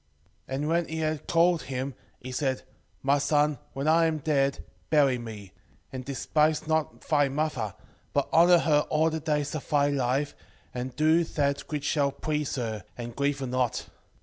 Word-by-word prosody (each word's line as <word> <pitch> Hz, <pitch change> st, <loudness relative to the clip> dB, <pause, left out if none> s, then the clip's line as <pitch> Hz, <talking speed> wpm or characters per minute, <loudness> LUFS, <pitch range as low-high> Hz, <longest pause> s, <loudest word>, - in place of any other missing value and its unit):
4:3 135 Hz, -, -2 dB
And 145 Hz, +2 st, -2 dB
when 170 Hz, +1 st, +1 dB
he 160 Hz, -, -4 dB
had 155 Hz, -1 st, -2 dB
called 170 Hz, 0 st, +3 dB
him, 130 Hz, +1 st, -4 dB, 0.3 s
he 130 Hz, -, -8 dB
said, 130 Hz, 0 st, -1 dB, 0.4 s
My 140 Hz, +1 st, +3 dB
son, 145 Hz, -1 st, +2 dB
when 135 Hz, +2 st, -3 dB
I 165 Hz, +1 st, +5 dB
am 160 Hz, -1 st, 0 dB
dead, 140 Hz, -2 st, 0 dB, 0.3 s
bury 140 Hz, -5 st, +4 dB
me; 105 Hz, -5 st, -8 dB, 0.4 s
and 130 Hz, -1 st, -5 dB
despise 150 Hz, +3 st, +1 dB
not 155 Hz, -7 st, -1 dB
thy 145 Hz, -3 st, +2 dB
mother, 150 Hz, +3 st, -2 dB, 0.4 s
but -, -, +1 dB
honour 175 Hz, +2 st, +7 dB
her 150 Hz, -3 st, +3 dB
all 160 Hz, +1 st, +2 dB
the 160 Hz, -, -2 dB
days 150 Hz, -2 st, -1 dB
of 155 Hz, -, -5 dB
thy 145 Hz, -1 st, +3 dB
life, 140 Hz, +1 st, 0 dB, 0.4 s
and 125 Hz, 0 st, -5 dB
do 155 Hz, +3 st, +4 dB
that 140 Hz, -3 st, -1 dB
which 145 Hz, -2 st, -2 dB
shall 140 Hz, -2 st, +2 dB
please 150 Hz, +1 st, -2 dB
her, 110 Hz, -6 st, -3 dB
and 120 Hz, -1 st, -6 dB
grieve 140 Hz, 0 st, 0 dB
her -, -, -1 dB
not. 125 Hz, -2 st, -1 dB
145 Hz, 175 wpm, -27 LUFS, 130-155 Hz, 0.4 s, honour